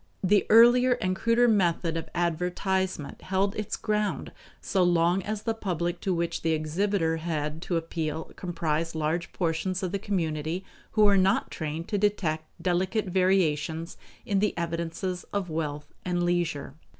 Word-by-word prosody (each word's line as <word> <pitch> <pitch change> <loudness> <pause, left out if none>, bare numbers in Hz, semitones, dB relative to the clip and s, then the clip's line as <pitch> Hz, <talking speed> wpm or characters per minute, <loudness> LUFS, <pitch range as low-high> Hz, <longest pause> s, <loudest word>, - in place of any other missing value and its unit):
The 200 +2 +3
earlier 240 +3 +7
and 185 -5 -1
cruder 230 +4 +3
method 175 -6 +2
of 165 -1 -4
advertisement 180 0 -1
held 195 +2 0
its 210 -2 -3
ground 210 -1 -1 0.3
so 190 - 0
long 175 +1 +3
as 210 +2 -4
the 225 - 0
public 175 -5 -2
to 190 - -1
which 170 -1 -1
the 165 -1 +1
exhibitor 165 +2 0
had 155 -1 -3
to 175 -1 -1
appeal 160 -1 -3
comprised 165 -2 -2
large 160 +3 -1
portions 180 +2 -1
of 180 - -1
the 200 - -1
community 170 -3 -2 0.3
who 215 - +4
were 200 -1 +6
not 190 +1 +2
trained 160 +2 -4
to 205 - 0
detect 175 -7 0
delicate 185 +4 0
variations 170 -3 +1 0.3
in 200 -1 +1
the 210 -2 0
evidences 170 +2 -3
of 195 -4 -2
wealth 150 -2 -4
and 175 -1 0
leisure. 175 -6 -1
175 Hz, 150 wpm, -27 LUFS, 165-195 Hz, 0.3 s, earlier